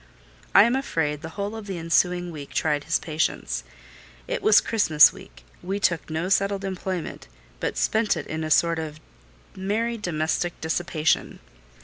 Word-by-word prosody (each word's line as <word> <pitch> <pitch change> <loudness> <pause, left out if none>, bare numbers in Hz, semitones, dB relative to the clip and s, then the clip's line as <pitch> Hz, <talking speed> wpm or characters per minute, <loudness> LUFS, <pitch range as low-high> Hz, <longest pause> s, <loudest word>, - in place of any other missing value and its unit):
I 200 - +10
am 235 +3 +2
afraid 155 - -1
the 160 - -6
whole 200 +2 -3
of 220 -2 -8
the 190 -2 -4
ensuing 175 +1 +1
week 145 -3 -9
tried 150 -2 0
his 165 - +2
patience. 155 - -2 0.6
It - - -2
was 215 - +6
Christmas 160 -9 +5
week: - - -15 0.2
we 195 +3 -3
took 170 -4 +1
to 160 - -7
no 160 +3 -1
settled 195 0 +1
employment, 185 -2 -4 0.3
but - - -3
spent 220 -5 +1
it 150 - -5
in 160 0 -4
a 155 - -3
sort 165 +1 +3
of 155 -1 -6 0.6
merry 220 +5 -1
domestic 170 -1 -2
dissipation. 160 -1 0
175 Hz, 160 wpm, -25 LUFS, 155-195 Hz, 0.6 s, I